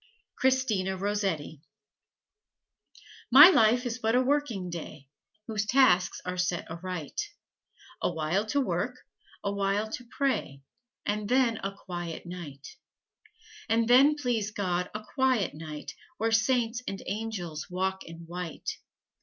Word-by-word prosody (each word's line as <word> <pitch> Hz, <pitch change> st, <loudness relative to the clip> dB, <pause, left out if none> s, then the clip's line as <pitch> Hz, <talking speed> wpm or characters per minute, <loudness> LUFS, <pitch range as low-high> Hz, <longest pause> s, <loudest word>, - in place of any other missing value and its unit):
CHRISTINA 225 Hz, -8 st, +1 dB
ROSSETTI 190 Hz, -7 st, -2 dB, 1.7 s
My 290 Hz, +7 st, +11 dB
life 245 Hz, -4 st, +4 dB
is 240 Hz, 0 st, -3 dB
but 225 Hz, 0 st, +1 dB
a 250 Hz, -, +5 dB
working 250 Hz, -10 st, 0 dB
day, 155 Hz, -5 st, -8 dB, 0.4 s
Whose 210 Hz, -2 st, -2 dB
tasks 205 Hz, -9 st, +4 dB
are 180 Hz, 0 st, -3 dB
set 180 Hz, -1 st, -1 dB
aright: 175 Hz, -, -4 dB, 0.8 s
A -, -, +1 dB
while 170 Hz, +6 st, -1 dB
to 285 Hz, -, +1 dB
work, 270 Hz, -, -1 dB, 0.5 s
a 200 Hz, -, 0 dB
while 200 Hz, +2 st, 0 dB
to 250 Hz, -, -5 dB
pray, 200 Hz, -, -1 dB, 0.4 s
And 210 Hz, 0 st, -2 dB
then 250 Hz, -3 st, +3 dB
a 195 Hz, -1 st, -4 dB
quiet 175 Hz, -3 st, -6 dB
night. 165 Hz, -6 st, -9 dB, 0.9 s
And 225 Hz, 0 st, +2 dB
then, 270 Hz, +5 st, +6 dB
please 240 Hz, -7 st, -1 dB
God, 180 Hz, -4 st, -2 dB
a 210 Hz, -, -4 dB
quiet 260 Hz, -, +2 dB
night 150 Hz, -1 st, -7 dB, 0.2 s
Where 225 Hz, 0 st, 0 dB
Saints 230 Hz, +1 st, +2 dB
and 195 Hz, -, -4 dB
Angels 195 Hz, -7 st, -4 dB
walk 190 Hz, +1 st, -2 dB
in 165 Hz, 0 st, -10 dB
white. 175 Hz, -1 st, -5 dB
200 Hz, 130 wpm, -28 LUFS, 175-240 Hz, 1.7 s, My